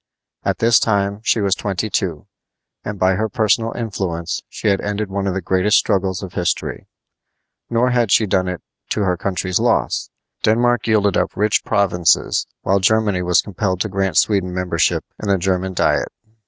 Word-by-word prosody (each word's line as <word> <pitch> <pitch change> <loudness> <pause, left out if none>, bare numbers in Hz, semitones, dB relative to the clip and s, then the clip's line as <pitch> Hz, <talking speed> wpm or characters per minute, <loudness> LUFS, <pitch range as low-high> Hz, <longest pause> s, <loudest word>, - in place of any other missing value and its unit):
At - - 0
this 115 0 +4
time 100 -2 0
she 115 -1 +1
was 100 -2 +2
twenty 100 +1 -2
two, 90 -8 -2 0.6
and 105 0 -5
by 95 0 +3
her 110 +4 -1
personal 115 0 +1
influence 90 -7 -3
she - - -4
had 100 -1 +1
ended 105 0 -3
one 100 0 -2
of 95 - -1
the 95 - -3
greatest 95 +4 +3
struggles 95 -2 0
of 95 - -8
history. 90 -2 -2 0.8
Nor 120 +2 +2
had 120 -4 +1
she 110 - +5
done 95 -2 0
it 90 -1 -5 0.3
to - - -1
her 90 -3 +1
country's 90 0 -1
loss. - - 0 0.3
Denmark 120 +1 +2
yielded 105 -3 +2
up - - -1
rich 105 +1 +2
provinces, 90 -5 +1 0.2
while 100 +1 +2
Germany 105 -1 +2
was 90 -1 +2
compelled 95 -2 -2
to 110 - -1
grant 95 -3 -1
Sweden 95 -4 +2
membership 90 0 0 0.2
in 105 - -3
the 100 - +3
German 95 +1 -1
diet. - - +1
100 Hz, 175 wpm, -19 LUFS, 90-110 Hz, 0.8 s, she